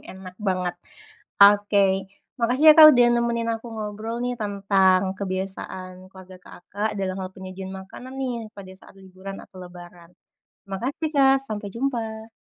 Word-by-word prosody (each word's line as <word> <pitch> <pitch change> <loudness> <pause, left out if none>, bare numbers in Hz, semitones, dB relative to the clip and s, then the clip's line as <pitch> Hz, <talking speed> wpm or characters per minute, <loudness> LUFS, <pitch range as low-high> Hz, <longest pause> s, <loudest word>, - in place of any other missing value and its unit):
enak 190 -1 -11
banget. 185 -3 -1 0.7
Oke. 200 -2 +4 0.3
Makasih 260 +7 +6
ya, - - -2
Kak, 310 -2 +10
udah 245 -1 +5
nemenin 235 -1 -1
aku 225 +1 -6
ngobrol 220 +1 -5
nih 245 0 -2
tentang 195 -2 +2
kebiasaan 185 -1 -6
keluarga 185 -1 -14
Kakak 205 +5 -6
dalam 190 -1 -3
hal 185 - -6
penyajian 190 0 -8
makanan 195 +7 -10
nih 245 -4 -4
pada 190 -1 -10
saat - - -18
liburan 190 0 -10
atau 190 - -20
lebaran. 175 -1 -13 0.6
Makasih, 250 +11 -3
Kak, 270 -1 +5
sampai 215 -5 -4
jumpa. 225 -2 -4
200 Hz, 140 wpm, -23 LUFS, 190-230 Hz, 0.7 s, Kak